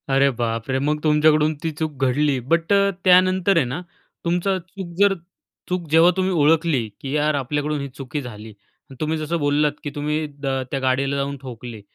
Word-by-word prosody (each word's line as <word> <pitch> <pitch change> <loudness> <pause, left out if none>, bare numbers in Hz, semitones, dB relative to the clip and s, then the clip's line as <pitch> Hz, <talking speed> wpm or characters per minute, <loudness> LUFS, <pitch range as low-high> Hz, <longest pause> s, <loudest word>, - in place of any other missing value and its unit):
अरे 135 +1 +4
बापरे! 115 +2 -1
मग 150 +2 0
तुमच्याकडून 155 0 +4
ती 165 - -1
चूक 150 -4 -3
घडली. 135 +1 +1
बट 165 +9 +1
अ, 200 0 +4 0.2
त्यानंतर 185 +1 +4
आहे 155 - +3
ना, 130 +8 -4 0.4
तुमचा 180 +3 +1
चूक 180 0 -9
जर 200 -1 +5 0.6
चूक 180 -2 -2
जेव्हा 165 +3 +6
तुम्ही 190 0 +1
ओळखली, 155 -5 +2
की 135 - -5
यार 150 0 +2
आपल्याकडून 145 +2 -1
ही 140 - -4
चुकी 135 +2 -6
झाली 110 -4 -9
आणि 105 +5 -19
तुम्ही 155 +1 0
जसं 155 +2 -2
बोललात, 145 0 +2
की 145 - -3
तुम्ही 150 +1 -1
द 140 - -4 0.2
त्या 135 - -1
गाडीला 135 +1 0
जाऊन 140 0 -2
ठोकले. 120 -4 -8
150 Hz, 180 wpm, -22 LUFS, 135-165 Hz, 0.6 s, जेव्हा